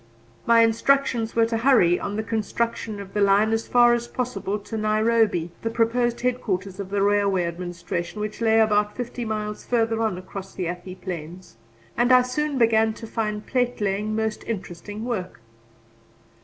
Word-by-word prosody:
My 230 0 +6
instructions 230 0 +2
were 230 0 +4
to 225 0 -1
hurry 225 -8 +4
on 200 - -4
the 220 - -2
construction 220 0 -2
of 195 -1 -9
the 210 - 0
line 200 +2 +4
as 225 0 -1
fast 240 -1 +5
as 235 0 -7
possible 210 -6 -3
to 210 +2 -8
Nairobi, 215 -5 +1
the 225 - -1
proposed 235 +1 0
headquarters 200 -6 -2
of 195 -2 -5
the 200 0 0
Railway 200 -2 +2
Administration, 170 +2 -4
which 210 +2 -5
lay 225 -1 +4
about 210 -1 +2
fifty 240 0 -4
miles 210 -1 -4
further 225 -2 0
on 220 -5 0
across 190 +1 -9
the 180 -3 -2
Athi 180 +1 -6
Plains; 175 -4 -8 0.4
and 245 +1 +2
I 255 0 +7
soon 285 +3 -2
began 225 -2 +3
to 225 - -9
find 215 -2 -3
platelaying 215 -4 -1
most 220 -1 -2
interesting 205 +1 -6
work. 190 - -4
215 Hz, 165 wpm, -24 LUFS, 195-230 Hz, 0.4 s, I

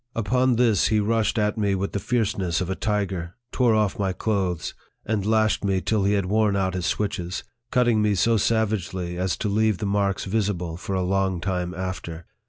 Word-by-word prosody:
Upon 125 +3 +2
this 115 -5 +3
he 110 - +2
rushed 110 +1 +1
60 - - +1
NARRATIVE 105 0 +3
OF 105 - -7
THE - - -1
at 100 - +2
me 100 - +2
with 95 +1 -2
the 100 - -2
fierceness 100 -7 0
of 95 0 -2
a - - -1
tiger, 95 -5 -2 0.2
tore 120 -4 +3
off 105 -2 +1
my 95 -2 0
clothes, 95 -5 -1 0.3
and 105 -2 -1
lashed 110 -1 +2
me 95 -2 +1
till 105 +1 0
he 100 - +3
had 100 -2 +1
worn 105 +1 +2
out 95 -1 0
hia 90 - -2
switches, 90 -1 -2 0.3
cutting 120 -3 +3
me 105 -1 +2
so 115 +6 +3
savagely 95 -5 0
as 95 -1 0
to 110 - -2
leave 110 0 +2
the 110 - -3
marks 100 -1 0
visible 95 -5 -1
for 95 +3 -4
a 95 - 0
long 95 -1 0
time 90 0 -2
after. 90 -3 -5
100 Hz, 215 wpm, -24 LUFS, 95-110 Hz, 0.3 s, this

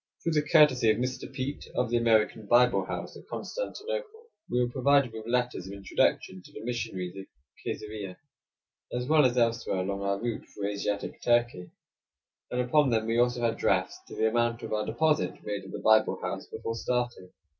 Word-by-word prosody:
Through 165 - 0
the 150 -2 +3
courtesy 150 -8 +6
of 110 - +3
Mr. 125 0 -3
Peet 135 +2 -4
of 125 -2 0
the 120 - +3
American 110 -2 +2
Bible 125 +2 +4
House - - -5
at - - -13
Constantinople, 470 -1 -5 0.2
we 125 - +1
were 120 -1 +1
provided 140 -1 +3
with 110 0 -7
letters 120 -6 -1
of 100 - -7
introduction 95 -1 0
to - - -16
the - - -9
missionaries 105 -7 -3
at 95 0 -8 0.4
Kaisarieh, 105 -3 -5 0.8
as 125 0 -2
well 155 -1 +5
as 125 0 -3
elsewhere 115 -4 +1
along 100 +1 -3
our 100 0 0
route 120 0 -3
through 100 0 -2
Asiatic 100 0 -3
Turkey, 120 -7 +1 0.8
and 125 - 0
upon 135 +3 +3
them 110 -2 +1
we 115 +1 +1
also 120 0 +2
had 115 -1 +1
drafts - - +1
to - - -9
the 110 - +2
amount 120 +1 0
of - - -4
our 105 0 -1
deposit 120 - +1
made 100 -2 -4
at 95 - -10
the - - -4
Bible 110 0 +4
House - - -4
before 115 - -4
starting. 120 -5 -2
120 Hz, 190 wpm, -28 LUFS, 105-125 Hz, 0.8 s, courtesy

